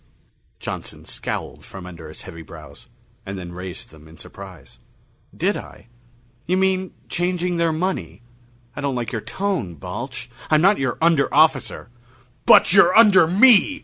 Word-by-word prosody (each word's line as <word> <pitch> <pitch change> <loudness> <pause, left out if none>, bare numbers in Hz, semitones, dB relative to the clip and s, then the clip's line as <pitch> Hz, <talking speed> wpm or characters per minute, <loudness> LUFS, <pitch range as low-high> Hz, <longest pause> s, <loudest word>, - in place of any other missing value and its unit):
Johnson - - -7
scowled - - -6
from 95 -2 -11
under 85 -3 -10
his 80 - -11
heavy 85 - -10
brows, 75 -3 -13 0.4
and 95 0 -7
then 90 -2 -8
raised 90 +1 -8
them 80 0 -17
in 80 +1 -16
surprise. 95 -2 -13 0.6
"Did - - 0
I? - - -11 0.6
You 185 +2 +1
mean 190 -1 0
changing 175 0 -1
their 170 -1 +1
money? 175 -5 -3 0.5
I - - -5
don't 140 -2 -2
like 120 -2 -3
your 110 - -3
tone, 185 - -3
Balch. 70 - -7 0.2
I'm 155 - +4
not 195 +5 +4
your 130 -3 -1
under 165 -4 +3
officer!" 145 -7 +2 0.6
"But - - +6
you're 190 -1 +6
under 205 -7 +7
me!" 235 - +5
145 Hz, 150 wpm, -21 LUFS, -, 0.6 s, under